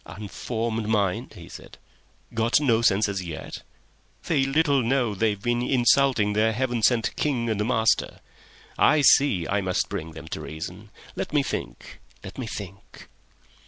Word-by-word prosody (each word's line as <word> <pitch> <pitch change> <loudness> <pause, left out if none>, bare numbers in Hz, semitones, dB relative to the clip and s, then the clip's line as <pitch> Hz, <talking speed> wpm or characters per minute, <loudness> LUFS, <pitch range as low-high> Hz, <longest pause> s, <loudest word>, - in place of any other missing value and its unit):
"Unformed 110 +5 -4
mind!" 100 -4 0
he - - -11
said. - - -12 0.6
"Got 115 +4 +2
no 120 -6 +2
senses 100 -3 +2
yet! 85 -3 -7 0.6
They 140 -5 +1
little 140 0 +2
know 120 -2 0
they've 105 0 0
been 120 +3 -1
insulting 125 -3 +3
their 110 +2 +2
Heaven 120 0 -1
sent 115 -1 +2
King 120 -6 -1
and 105 -1 -1
master..... 110 -2 +1 0.6
"I 155 0 +5
see 135 - +4
I 100 +1 0
must 95 -1 -1
bring 80 -5 -5
them 80 0 -10
to - - -5
reason. 90 +7 -8 0.3
"Let - - -5
me - - +3
think. - - -6 0.2
"Let 95 +5 -9
me 125 - -4
think." 100 -2 -10
110 Hz, 150 wpm, -25 LUFS, 100-125 Hz, 0.6 s, I